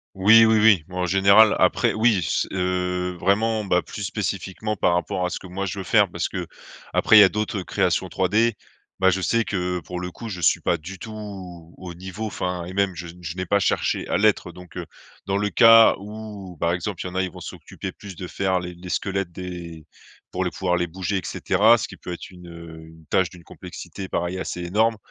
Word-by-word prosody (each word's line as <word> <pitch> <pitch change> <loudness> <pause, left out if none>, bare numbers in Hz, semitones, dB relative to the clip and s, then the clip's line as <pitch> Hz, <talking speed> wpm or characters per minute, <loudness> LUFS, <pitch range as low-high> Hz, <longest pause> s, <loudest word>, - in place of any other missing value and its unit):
Oui, 110 +4 +7
oui, 110 -1 +4
oui, 105 -7 +5
en 90 0 -2
général. 100 +4 +5
Après, - - +2
oui, 110 -4 +3
c 75 - 0
heu, 90 -1 -1
vraiment, 105 +4 +1
bah, 90 -2 +2
plus 105 - -8
spécifiquement 100 +1 -3
par 90 - +2
rapport 90 +2 -1
à 90 - -1
ce - - -4
que - - -12
moi 95 +2 -4
je 100 0 -4
veux 95 - -4
faire, 100 0 +3
parce - - -2
que, - - -5 0.5
après, 110 - +5
il - - +11
y - - +10
a 95 - +6
d'autres 105 -2 -2
créations - - 0
3D. 105 +6 +2 0.5
Bah, 95 - +5
je 95 +1 -1
sais 115 +6 +2
que, 90 -3 -2
pour 90 +3 -7
le 90 0 -5
coup, 115 +5 -9
je 90 -4 -6
suis 80 - +3
pas 85 - +1
du 90 +5 -10
tout 110 - -8 0.7
au 90 -2 -8
niveau, 95 +5 -6
enfin, 90 -4 -3
et 90 - -8
même 100 -1 +1
je 85 +1 -7
n 85 +1 -12
je 80 +1 -6
n'ai 95 - -3
pas 100 - +3
cherché 100 - 0
à - - +1
l'être. 100 -4 +2
Donc, 90 0 -14
heu, - - -5 0.4
dans 100 0 0
le 105 0 0
cas 115 +2 +7
où, 105 -2 -9
par 85 0 +1
exemple, 90 +1 -4
il - - -5
y - - -7
en - - -12
a, 95 - +2
ils 95 - -3
vont - - -11
s'occuper - - -8
plus 100 -2 -11
de 90 +2 -7
faire 95 -1 0
les 90 0 -7
les 90 +1 -11
squelettes, 95 -2 -2
des 85 -3 -8 0.4
pour 95 - -2
le 90 - -1
pouvoir 90 -1 -1
les 90 0 0
bouger 95 +3 -3
et - - -3
cetera, 110 +9 +3
ce - - -3
qui - - -11
peut - - -8
être 85 - -8
une, 90 -1 -13
heu, 85 -1 -11
une 80 0 -17
tâche 95 -2 +2
d'une 90 -1 -15
complexité, 95 +3 -9
pareil, 85 +2 -2
assez 90 -1 -4
énorme. 110 +6 +1
95 Hz, 235 wpm, -23 LUFS, 90-105 Hz, 0.7 s, il